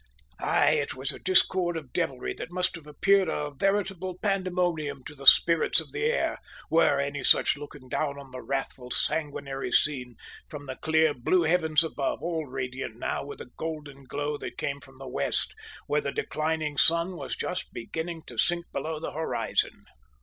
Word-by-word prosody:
Aye, - - +3
it - - -4
was 135 +2 +3
a - - -8
discord 185 -2 +3
of 145 -6 -9
devilry 130 -2 -1
that - - -7
must 180 0 0
have 160 -3 -11
appeared 190 +5 +3
a 150 -1 -2
veritable 190 0 0
pandemonium 180 -8 -1
to - - -8
the 140 -2 -7
spirits 165 +3 +8
of - - -8
the 435 - -2
air, 475 +1 +1 0.3
were 160 -4 +4
any 140 0 -2
such - - +5
looking 145 -2 -10
down 140 +2 -1
on 140 -2 -11
the 130 0 -7
wrathful, 135 -2 -4
sanguinary 140 -3 -1
scene 125 -5 +1 0.3
from 145 -1 -8
the 130 -1 -5
clear 160 -1 +3
blue 170 +8 +2
heavens 160 -1 +3
above, 150 -3 -2
all 165 -3 -2
radiant 130 -3 -4
now - - -2
with 140 0 -8
a 125 - -11
golden 150 -4 -6
glow 145 +2 -3
that - - -7
came 140 0 -2
from 135 -1 -16
the 135 0 -9
west, 70 - +2 0.3
where 150 0 +1
the 140 - -2
declining 155 -1 -2
sun 170 +4 +3
was - - -4
just 180 0 -4
beginning 160 +7 -5
to 120 -2 -8
sink 175 0 +2
below 155 -1 -3
the 165 - -4
horizon! 160 +2 -1
150 Hz, 180 wpm, -28 LUFS, 135-170 Hz, 0.3 s, spirits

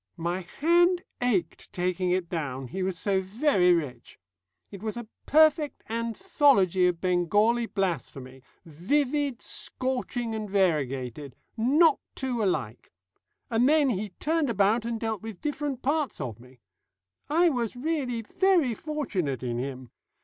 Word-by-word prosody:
My 175 +3 -2 0.2
hand 345 +4 +4 0.2
ached 205 -9 -1
taking 180 0 -1
it 180 -1 0
down, 135 -7 -4
he 190 - -4
was 185 -1 -1
so 195 +1 +1
very 190 -2 +2
rich. 140 -9 -2 0.5
It 195 - -9
was 220 +1 -4
a 240 -2 -6 0.2
perfect 310 0 +3
anthology 230 - +2
of 175 -2 -1
Bengali 205 +7 +2
blasphemy 140 -10 -3 0.2
vivid, 270 - -1
scorching, 250 -2 -3
and 215 -2 -4
variegated. 140 - -1 0.2
Not 285 +7 +4 0.2
two 250 -4 -2
alike. 125 - -2 0.6
And 235 +4 +3
then 300 -3 +4
he 210 0 -3
turned 320 -2 +1
about 215 +2 +2
and 230 -1 -2
dealt 220 -3 -3
with 220 -5 -8
different 290 -3 -3
parts 295 +1 0
of 120 -7 -5
me. 125 0 -18 0.7
I 335 +3 +4
was 245 -5 -2
really 255 -4 -2
very 345 - +2
fortunate 200 - -3
in 120 -1 -2
him. 130 -1 -6
215 Hz, 135 wpm, -27 LUFS, 175-275 Hz, 0.7 s, hand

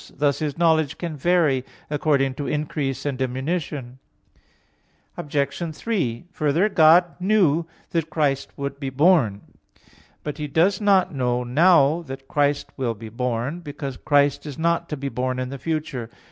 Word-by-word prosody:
Thus 145 0 +1
His 150 -3 -3
knowledge 160 -3 +2
can 170 -3 -4
vary 150 -4 +2 0.2
according 145 -3 +1
to 140 +2 -5
increase 145 -3 -2
and 140 -3 -2
diminution. 130 -1 -3 1.2
Obj. 150 +3 -2
3: 150 - -2
Further, 155 +7 +1
God 170 -1 +6
knew 180 -5 +2 0.2
that 165 -3 -1
Christ 145 -3 0
would 140 0 -4
be 135 -2 -3
born. 135 - +3 0.8
But 150 +1 -5
He 150 - -3
does 180 +7 +2
not 195 -4 +3
know 125 -2 0
now 155 +4 +4
that 135 0 -8
Christ 145 -1 0
will 120 -4 -1
be 110 +1 -9
born; 125 +6 -2
because 145 -5 -6
Christ 145 0 +2
is 145 - -7
not 170 +1 0
to 150 - -3
be 140 +1 -4
born 130 0 -2
in 130 0 -3
the 140 0 -7
future. 150 -6 -3
145 Hz, 150 wpm, -23 LUFS, 135-165 Hz, 1.2 s, God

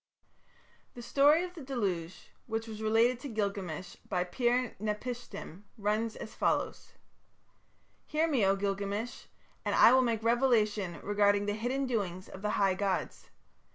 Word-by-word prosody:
The 240 - -8
story 290 +7 +4
of 360 0 -6
the 340 - -9
Deluge 195 -11 -3 0.2
which 225 -1 -2
was 220 -1 -7
related 225 +3 +3
to 280 - -7
Gilgamesh 195 -6 -3
by 180 -3 +1
Pir 240 +5 0
napishtim 215 -4 -5 0.2
runs 215 +2 0
as - - -8
follows: - - -1 1.1
"Hear 310 +2 +1
me, 275 -9 +2
O 195 0 +4
Gilgamesh, 200 +3 -3 0.4
and - - 0
I 235 - +8
will 260 - +6
make 230 -3 0
revelation 215 - +2
regarding 205 0 +3
the 205 - 0
hidden 250 +6 -1
doings 195 -7 -2
of 190 - -10
the 210 - -1
high 195 -2 +3
gods. 195 0 -2
215 Hz, 145 wpm, -31 LUFS, 200-245 Hz, 1.1 s, I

